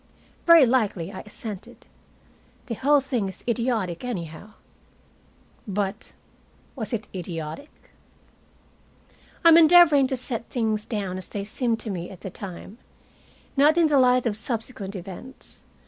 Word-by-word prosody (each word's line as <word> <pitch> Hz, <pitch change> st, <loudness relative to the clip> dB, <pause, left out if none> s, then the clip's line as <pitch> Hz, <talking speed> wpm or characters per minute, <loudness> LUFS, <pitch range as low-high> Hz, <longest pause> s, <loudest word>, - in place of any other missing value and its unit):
"Very 335 Hz, -4 st, +9 dB
likely," 210 Hz, -8 st, 0 dB
I 190 Hz, -, -7 dB
assented. 210 Hz, -3 st, -9 dB, 0.8 s
"The 235 Hz, -, -4 dB
whole 285 Hz, +5 st, +3 dB
thing 250 Hz, -7 st, -2 dB
is 190 Hz, -, -10 dB
idiotic, 230 Hz, -7 st, -1 dB
anyhow." 190 Hz, -3 st, -6 dB, 1.1 s
But 200 Hz, +2 st, -3 dB, 0.6 s
was 220 Hz, -6 st, -5 dB
it 230 Hz, -3 st, -3 dB
idiotic? 175 Hz, -, -6 dB, 1.8 s
I -, -, +10 dB
am 330 Hz, -, +8 dB
endeavoring 320 Hz, -4 st, +7 dB
to 265 Hz, 0 st, -2 dB
set 240 Hz, -2 st, -5 dB
things 220 Hz, -3 st, -1 dB
down 195 Hz, -5 st, -3 dB
as 185 Hz, -, -11 dB
they 200 Hz, -1 st, -5 dB
seemed 230 Hz, +1 st, -1 dB
to 220 Hz, -, -5 dB
me 175 Hz, -2 st, -5 dB
at 185 Hz, -3 st, -12 dB
the 190 Hz, -, -6 dB
time, 195 Hz, +4 st, -9 dB, 0.8 s
not 295 Hz, +4 st, +4 dB
in 330 Hz, -2 st, +4 dB
the 285 Hz, -2 st, +4 dB
light 250 Hz, -1 st, +4 dB
of 220 Hz, -3 st, 0 dB
subsequent 215 Hz, -2 st, -5 dB
events. 190 Hz, +8 st, -10 dB
225 Hz, 135 wpm, -25 LUFS, 195-260 Hz, 1.8 s, I